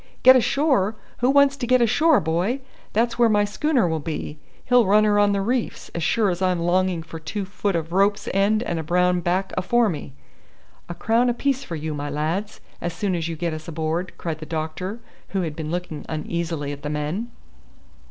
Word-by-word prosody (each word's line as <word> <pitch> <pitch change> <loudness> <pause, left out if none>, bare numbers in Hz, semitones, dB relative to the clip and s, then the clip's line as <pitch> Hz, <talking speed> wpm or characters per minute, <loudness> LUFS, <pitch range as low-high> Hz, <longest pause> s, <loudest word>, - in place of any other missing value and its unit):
"Get 260 0 +9
ashore! 255 -5 +2 0.2
Who 245 - +2
wants 280 0 +5
to 245 -2 -3
get 255 +1 +4
ashore, 290 +6 +4
boy? 175 - -1 0.3
That's 230 +2 0
where 235 -1 +5
my 205 -1 +3
schooner 250 - +1
will 160 -1 -1
be. 150 0 -5 0.3
He'll 245 -4 +4
run 210 +2 +5
her 205 -1 +3
on 205 0 +4
the 200 -1 0
reefs, 240 +4 -2
as 170 - -3
sure 205 +5 +2
as 175 +1 -4
I'm 185 -1 +2
longing 175 0 +1
for 165 0 -9
two 175 +6 -4
foot 200 0 -2
of 165 0 -3
rope's 200 +3 +2
end 205 +3 +2
and 170 -7 -2
a - - -3
brown 180 +2 +2
back 180 +3 -1
afore 235 +4 +2
me." 145 -5 -6 0.8
"A 175 - -5
crown 230 +7 +2
apiece 270 +2 0
for 170 - -6
you, 155 0 -4
my 145 0 -4
lads, 160 +9 -3 0.2
as 175 -1 -3
soon 200 -3 -1
as 165 -2 -1
you 165 - -4
get 170 +1 -2
us 155 0 -7
aboard," 165 +2 -2
cried 160 -2 -4
the 155 - -8
doctor, 165 +7 -4 0.3
who 195 -2 -2
had 155 -3 -4
been 155 -1 -5
looking 175 -2 -4
uneasily 160 -1 -3
at 145 0 -7
the 150 - -4
men. 150 +10 -3
185 Hz, 205 wpm, -23 LUFS, 160-225 Hz, 0.8 s, Get